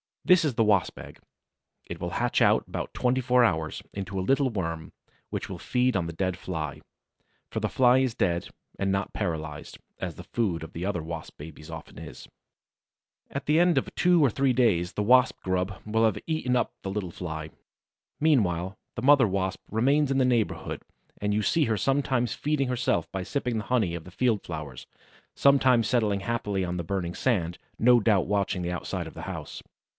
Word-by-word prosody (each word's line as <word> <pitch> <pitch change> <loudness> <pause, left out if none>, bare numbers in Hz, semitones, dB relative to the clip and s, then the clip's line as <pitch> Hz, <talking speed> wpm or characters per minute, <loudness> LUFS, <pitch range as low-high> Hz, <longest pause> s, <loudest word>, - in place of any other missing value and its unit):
This 180 -2 +5
is 145 - 0
the 115 0 +2
Wasp's 105 -4 +2
egg. - - -11 0.7
It - - -7
will - - -4
hatch - - 0
out - - +4
in - - -20
about - - -4
twenty 125 +1 +1
four 125 0 +4
hours, 80 -8 0
into 95 -1 -4
a - - 0
little 135 +7 +2
worm, 85 -7 -4 0.4
which - - -4
will - - -6
feed 125 -1 +1
on 90 -3 +1
the 85 - -5
dead 95 +1 -1
Fly. 80 -6 -5 0.7
For - - -2
the - - -1
Fly 125 0 +4
is 130 -3 0
dead, 85 -1 0 0.3
and 95 0 +1
not 95 0 -1
paralyzed, 80 -3 -4 0.2
as - - -4
the - - -9
food 95 -9 -1
of 80 - -10
other 90 0 -2
Wasp 80 0 -7
babies 75 0 -10
often - - -9
is. - - -10 1.0
At 140 - -5
the 150 +2 +3
end 175 -3 +4
of 135 - -1
two 175 -3 +4
or 140 - +5
three 135 +2 +2
days 100 -8 +2
the 105 - -1
Wasp 125 +4 +5
grub 95 +1 -1
will 110 +1 +2
have 110 - +1
eaten 155 -6 0
up 125 - +1
the 95 - -4
little 95 -3 -3
Fly. 80 -3 -6 0.7
Meanwhile 100 - +1 0.2
the 120 - -5
mother 140 -3 +6
Wasp 95 -1 -2
remains 135 +7 +2
in 135 - +1
the 130 - +4
neighborhood 120 -4 0 0.4
and 105 0 -1
you 105 - +1
see 160 +5 +2
her 110 -2 0
sometimes 130 -2 +1
feeding 145 -3 -1
herself 120 -10 0
by 95 - -3
sipping 125 +3 -2
the 110 - -6
honey 110 -7 +1
of 80 - -7
the 90 - -11
field 115 +1 +1
flowers, 75 -6 -7 0.5
sometimes 130 -4 +4
settling 105 -6 +1
happily 100 -3 -1
on 90 0 -3
the 85 - -3
burning 85 0 -3
sand, 90 -9 0 0.2
no 120 +1 +6
doubt 105 -4 +2
watching 100 -2 0
the 85 - -2
outside 90 - -4
of - - -10
the - - -7
house. - - -6
105 Hz, 195 wpm, -27 LUFS, 90-125 Hz, 1.0 s, mother